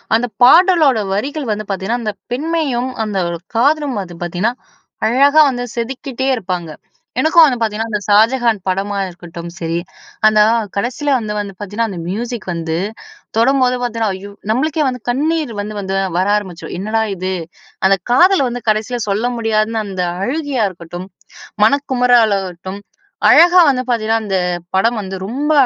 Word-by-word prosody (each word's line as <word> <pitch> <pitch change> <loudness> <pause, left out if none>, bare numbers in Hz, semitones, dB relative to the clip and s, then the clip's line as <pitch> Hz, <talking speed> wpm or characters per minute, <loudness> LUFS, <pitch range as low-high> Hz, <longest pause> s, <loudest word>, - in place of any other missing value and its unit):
அந்த 240 +2 +1 0.2
பாடலோட 320 - +6
வரிகள் 275 +5 -3
வந்து 210 0 -3
பாத்தீங்கன்னா, 205 +5 -2
அந்த 215 - -2 0.2
பெண்மையும் 280 -3 -1 0.2
அந்த 205 -2 -3
ஒரு 170 - -4 0.2
காதலும் 280 -2 +2
வந்து 175 -3 -9
பாத்தீங்கன்னா, 185 +8 -1 0.5
அழகா 280 +6 +4
வந்து 245 -1 -4
செதுக்கிட்டே 260 +2 -3
இருப்பாங்க. 180 -5 -4 0.5
எனக்கும் 320 +4 +6
வந்து 260 -5 +1
பாத்தீங்கன்னா, 225 +1 -1
அந்த 210 - 0
'ஷாஜகான்' 225 0 +3
படமா 195 +2 -1
இருக்கட்டும் 170 -1 -9
சரி, 165 0 -2 0.5
அந்த 215 0 +4 0.4
கடைசில 250 +8 -2
வந்து 215 -3 -4
வந்து 200 -1 -5
பாத்தீங்கன்னா, 210 +3 -2
அந்த 175 - -6
மியூசிக் 235 +2 -4
வந்து 165 -1 -3 0.6
தொடம்போது 255 +1 +3
பாத்தீங்கன்னா. 230 -4 -1
ஐயோ! 200 +2 -9 0.2
நம்ளுக்கே 305 +6 0
வந்து 250 -2 -3
கண்ணீர் 305 +2 0
வந்து 210 +1 -4
வந்து 195 -1 -3 0.2
வர 185 - +2
ஆரம்பிச்சுரும், 190 -4 -5
என்னடா 215 +4 -1
இது? 185 +1 -3 0.5
அந்த 195 0 +4
காதல 365 +9 +5
வந்து, 245 0 -5
கடைசில 220 +3 0
சொல்ல 220 +5 0
முடியாதுன்னு 220 0 0
அந்த 185 -2 -3 0.2
அழுகையா 280 -2 -1
இருக்கட்டும், 175 0 -9 0.6
மனக்குமராலாகட்டும், 220 -8 +1 0.5
அழகா 350 +1 +7
வந்து 255 -1 -1
பாத்தீங்கன்னா, 225 -1 +1
அந்த 195 -2 0 0.4
படம் 230 +4 +2
வந்து 190 -1 -6
ரொம்ப 285 +8 -1
225 Hz, 145 wpm, -17 LUFS, 195-260 Hz, 0.6 s, அழகா